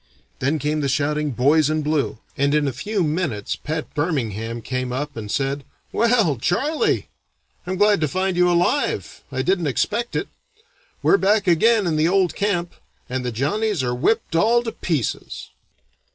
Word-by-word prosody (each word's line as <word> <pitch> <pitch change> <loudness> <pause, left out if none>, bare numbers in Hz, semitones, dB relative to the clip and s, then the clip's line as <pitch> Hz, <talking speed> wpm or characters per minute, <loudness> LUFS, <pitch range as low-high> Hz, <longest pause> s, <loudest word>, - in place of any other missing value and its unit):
Then 145 +5 +1
came 150 +1 -1
the 140 - 0
shouting 150 +2 0
'boys 145 +4 +3
in 155 0 0
blue,' 150 -4 0 0.2
and 140 +1 +2
in 150 -1 +2
a 135 - -1
few 195 - -1
minutes 150 - -1
Pat 155 +1 -5
Birmingham 115 - -2
came 130 0 -3
up 145 +3 -3
and 110 -2 -6
said: 135 +4 -1 0.3
'Well, 225 - +2
Charley, 280 - 0 0.6
I'm 185 - -1
glad 205 -3 +4
to 155 - +2
find 185 +5 -1
you 180 0 +4
alive. 175 - 0
I 130 - -1
didn't 180 0 +1
expect 210 - -1
it. - - -1 0.8
We're - - +5
back 205 +2 +2
again 205 +5 +4
in 160 -3 0
the 155 +1 +3
old 185 -3 +2
camp, 175 -4 -1 0.4
and 130 0 -2
the 125 - -2
Johnnies 175 - 0
are 125 -1 0
whipped 165 - 0
all 230 +7 +4
to 225 - -3
pieces.'" 155 - -3
155 Hz, 165 wpm, -22 LUFS, 135-195 Hz, 0.8 s, We're